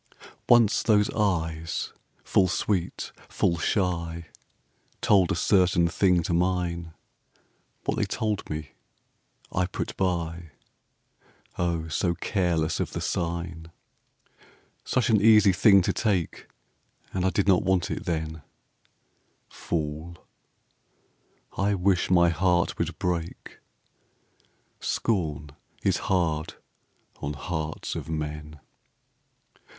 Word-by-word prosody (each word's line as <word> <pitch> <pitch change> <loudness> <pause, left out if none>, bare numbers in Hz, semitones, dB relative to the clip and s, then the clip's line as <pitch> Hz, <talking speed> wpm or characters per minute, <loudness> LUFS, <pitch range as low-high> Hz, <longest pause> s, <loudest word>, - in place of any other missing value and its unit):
Once 120 -3 +5
those 105 -2 +3
eyes, 80 -6 -1 0.3
full 95 - +3
sweet, 90 0 -2 0.2
full 85 -1 0
shy, 85 -3 -1 0.7
Told 95 -5 +4
a - - +1
certain 90 -2 +3
thing 90 0 +2
to 85 - -2
mine; 85 -2 -1 0.9
What - - -1
they - - +1
told 105 -3 -2
me 75 0 -5 0.8
I 90 0 0
put 90 - -5
by, 85 -3 -2 1.1
O, 85 -2 -1
so 85 +2 0
careless 85 -6 0
of - - -2
the - - -3
sign. 85 -1 -3 1.1
Such 130 -2 +1
an 105 -2 +4
easy 105 -2 +6
thing 100 0 +6
to - - 0
take, 95 -7 -1 0.7
And 95 - -1
I 95 - +3
did 100 +1 0
not 95 -2 +5
want 95 -2 +1
it 105 - -4
then; 80 -3 -3 1.1
Fool! 80 +1 -4 1.4
I 100 +1 +1
wish 95 -1 +1
my 85 -1 +5
heart 90 +1 +1
would - - -2
break, 85 -1 -4 1.2
Scorn 75 -9 -1 0.3
is - - +2
hard 80 -4 0 0.6
on 70 - -4
hearts 80 0 -4
of - - -6
men. 75 -1 -5
85 Hz, 105 wpm, -26 LUFS, 80-95 Hz, 1.4 s, easy